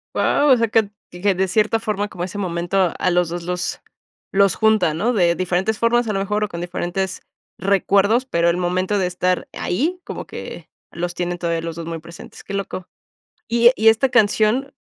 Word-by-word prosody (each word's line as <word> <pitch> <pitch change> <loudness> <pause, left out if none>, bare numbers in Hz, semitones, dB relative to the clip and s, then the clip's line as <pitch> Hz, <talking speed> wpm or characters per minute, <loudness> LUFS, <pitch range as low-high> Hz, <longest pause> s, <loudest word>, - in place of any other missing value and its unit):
Guau, 290 0 +3
o 255 - +7
sea 230 -1 +1
que 215 -2 +1 0.2
que 190 +3 0
de 190 +1 +1
cierta 215 +4 +1
forma, 210 -2 -2
como 175 -4 -6
ese 185 +3 -5
momento, 175 0 0
a - - +1
los 175 -1 +2
2 175 0 -5
los 180 +1 -3 0.5
los 195 -1 +4
junta, 220 -7 +3
¿no?, 220 +9 +1
de 175 -5 +3
diferentes 185 +4 0
formas, 235 0 +2
a 215 - -1
lo 195 - -1
mejor, 210 +2 -1
o - - 0
con 170 0 -6
diferentes 180 +1 -3 0.4
recuerdos, 200 +5 +2
pero 170 -8 +1
el 170 - +1
momento 185 +3 0
de 185 - +1
estar 180 0 -1
ahí, 315 - -1
como - - -7
que - - -9 0.2
los 175 +1 -4
tienen 175 0 -2
todavía 170 -1 -1
los 165 -1 -5
2 165 0 -6
muy 165 - -4
presentes, 170 +1 -12
qué 200 - -8
loco. 195 -2 -4 0.6
Y 235 +1 +5
y 220 - +2
esta 225 +4 +5
canción, 235 +3 +2
190 Hz, 200 wpm, -20 LUFS, 175-220 Hz, 0.6 s, o